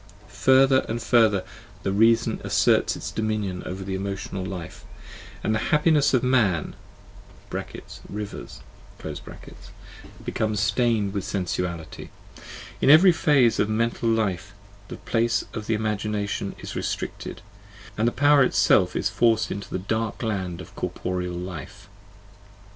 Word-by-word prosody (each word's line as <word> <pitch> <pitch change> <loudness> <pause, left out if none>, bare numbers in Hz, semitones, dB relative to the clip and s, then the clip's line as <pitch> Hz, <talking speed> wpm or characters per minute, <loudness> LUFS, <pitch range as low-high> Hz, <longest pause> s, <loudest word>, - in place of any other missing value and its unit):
Further 130 0 +4
and 115 +1 -2
further 110 -5 +3 0.4
the 95 - 0
reason 115 +2 +3
asserts - - +2
its - - -6
dominion 105 -4 -2
over 95 +1 -5
the 95 0 -4
emotional 95 0 -4
life, 90 -3 -7 0.6
and 110 - +1
the 110 - +1
happinesses 150 -2 +3
of 130 - +1
man 110 -11 +1 1.3
(rivers) 105 0 -7 1.6
become 110 -1 -1
stained 105 -1 +1
with 100 -2 -2
sensual 90 -3 -2
ity: 80 - -10 0.7
in - - +3
every 165 +6 +8
phase 145 -8 +3
of 105 - +2
mental 115 +1 0
life 105 -3 -1 0.3
the - - -8
place 115 0 0
of 110 -3 -6
the 115 - +1
imagination 105 -2 -2
is - - -8
restricted, - - -4 0.5
and 110 +2 +1
the - - +2
power 145 +2 +4
itself 130 - +3
is - - +1
forced 115 -2 +2
into 100 0 -5
the - - -2
dark 110 +5 -3
land 95 -5 -3
of - - -13
cor - - -2
poreal 90 -1 -4
life. 95 +3 -8
110 Hz, 130 wpm, -24 LUFS, 95-115 Hz, 1.6 s, every